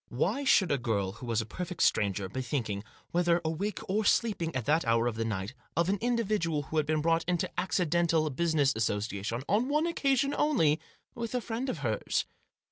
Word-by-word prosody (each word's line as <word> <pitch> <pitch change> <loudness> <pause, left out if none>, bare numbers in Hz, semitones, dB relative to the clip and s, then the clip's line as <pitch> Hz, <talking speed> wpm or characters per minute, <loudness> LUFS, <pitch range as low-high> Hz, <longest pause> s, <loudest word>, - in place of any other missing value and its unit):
Why 200 - 0
should 190 - +4
a 140 - +2
girl 100 -6 -1
who 115 +5 -10
was 115 -1 +1
a - - -5
perfect 180 +8 -3
stranger, 100 -1 +2
be 115 +8 -4
thinking, 115 -6 -2 0.3
whether 175 0 +3
awake 180 +7 -3
or 210 +3 +1
sleeping, 200 - +1
at 130 -4 -2
that 160 +3 +3
hour 115 0 +2
of 120 -2 -1
the 115 - -1
night, 105 0 -3 0.2
of 170 +2 +2
an 200 0 +1
individual 215 -10 0
who 155 - -5
had 150 -2 +2
been 155 -1 +1
brought 165 0 +2
into 175 -1 0
accidental 170 -3 +1
business 150 -1 +2
association, 110 +1 -2
on 220 +8 +2
one 300 +3 +2
occasion 275 -4 +1
only, 165 - +3 0.3
with 235 -1 -4
a - - +2
friend 235 +4 -3
of 165 - -3
hers? 110 -2 0
160 Hz, 195 wpm, -30 LUFS, -, 0.3 s, should